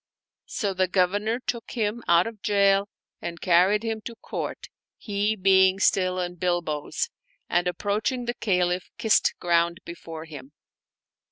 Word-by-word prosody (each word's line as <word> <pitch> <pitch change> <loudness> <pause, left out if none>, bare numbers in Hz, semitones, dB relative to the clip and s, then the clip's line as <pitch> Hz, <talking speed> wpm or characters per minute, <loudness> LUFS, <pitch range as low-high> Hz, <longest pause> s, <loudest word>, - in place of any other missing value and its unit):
So 200 -4 -2
the 185 0 +1
Governor 205 +5 +1
took 235 -2 -5
him 225 0 -1
out 170 +1 +5
of 225 -3 -7
jail 200 -1 +3 0.3
and 170 -1 -5
carried 185 +5 +3
him 225 -1 -3
to 235 - -5
the 230 - -23
Court - - -5 0.3
(he 205 0 -1
being 190 -1 +4
still 185 -2 +2
in 175 0 -4
bilboes), 175 -4 -1 0.4
and 175 +1 +1
approach 205 +6 -1
ing 250 -2 -4
the 240 - -1
Caliph 180 -5 0
kissed 225 -2 +3
ground 170 -1 +1
before 165 -1 -8
him. 145 -3 -11
190 Hz, 150 wpm, -25 LUFS, 175-210 Hz, 0.4 s, out